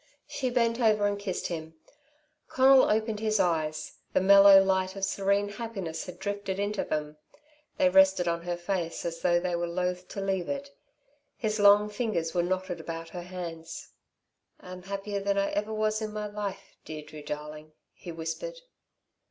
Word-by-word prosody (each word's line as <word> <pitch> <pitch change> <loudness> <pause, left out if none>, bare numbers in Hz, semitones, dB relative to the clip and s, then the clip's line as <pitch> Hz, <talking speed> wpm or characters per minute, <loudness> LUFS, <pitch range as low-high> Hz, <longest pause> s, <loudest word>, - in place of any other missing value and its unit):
She 260 -2 -3
bent 235 -1 +1
over 215 -3 +3
and 205 0 0
kissed 195 -3 -4
him. 160 -2 -5 0.7
Conal 265 0 +5
opened 220 0 0
his 215 -1 +1
eyes. 155 -3 -1
The - - +4
mellow 195 +1 +8
light 190 0 0
of 195 -1 -1
serene 200 +1 +1
happiness 200 -7 -5
had 180 -1 -8
drifted 200 0 -3
into 205 0 -1
them. 150 0 -3 0.6
They 185 - +4
rested 190 -1 +5
on 170 0 0
her 175 0 -3
face 175 -2 -3
as 165 -1 -4
though 175 -1 +3
they 180 0 -1
were 170 0 -1
loath 180 +1 -2
to - - -7
leave 195 -2 -1
it. 280 0 -4 0.7
His 215 -2 -1
long 205 +1 +6
fingers 210 -7 -2
were 175 - +2
knotted 185 0 -2
about 165 0 -6
her 180 - -7
hands. 170 -2 -7 0.7
"I'm 180 0 -10
happier 200 +2 -4
than 200 0 0
ever 205 +2 0
I - - -4
was 215 0 0
in 215 -1 -3
my 210 0 -3
life, 205 -2 -6
Deirdre, 155 -1 -9
darling," 150 +1 -7 0.2
he 175 - -9
whispered. 165 - -5
190 Hz, 170 wpm, -28 LUFS, 170-210 Hz, 0.7 s, mellow